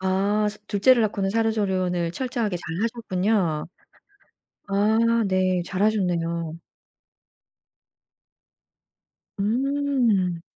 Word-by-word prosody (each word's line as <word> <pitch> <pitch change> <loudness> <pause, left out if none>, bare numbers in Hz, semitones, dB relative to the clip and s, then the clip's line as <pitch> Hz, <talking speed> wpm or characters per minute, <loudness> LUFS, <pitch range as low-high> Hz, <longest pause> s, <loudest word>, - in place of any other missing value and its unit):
아 195 +3 +1
스 205 - -7
둘째를 225 +4 +4
낳고는 200 -2 -1
산후조리원을 190 -6 0
철저하게 230 -3 -2
잘하셨군요. 190 -3 -1 1.0
아 220 +3 +2
네. 185 -1 +1
잘하셨네요. 175 -5 -1 2.8
음. 235 -6 +1
200 Hz, 175 characters per minute, -24 LUFS, 180-225 Hz, 2.8 s, 둘째를